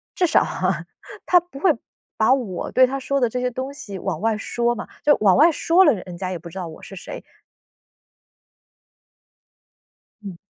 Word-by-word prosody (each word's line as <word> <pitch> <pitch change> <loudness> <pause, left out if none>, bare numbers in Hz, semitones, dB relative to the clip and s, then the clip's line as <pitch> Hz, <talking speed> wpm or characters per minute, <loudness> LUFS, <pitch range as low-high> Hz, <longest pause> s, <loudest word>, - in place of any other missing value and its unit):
至 360 - +2
少 - - +4
啊， - - -2 0.4
他 360 - +5
不 350 -5 -14
会 360 +3 +4 0.5
把 220 +3 +4
我 225 -10 -3
对 255 - +6
他 270 +2 -3
说 275 +1 -1
的 245 - +2
这 250 - -3
些 250 0 0
东 260 +3 -5
西 205 -8 -8
往 180 -4 -3
外 220 -1 +1
说 240 +2 -1
嘛， - - -7 0.2
就 295 - +5
往 200 -1 +5
外 320 +4 +7
说 340 +4 +3
了， 295 - +5
人 180 -4 -8
家 185 0 -4
也 180 - -3
不 170 +1 -11
知 180 - -11
道 180 - -4
我 160 - -11
是 195 - -10
谁。 - - -8 3.0
嗯。 190 -4 -8
240 Hz, 200 characters per minute, -22 LUFS, 190-275 Hz, 3.0 s, 外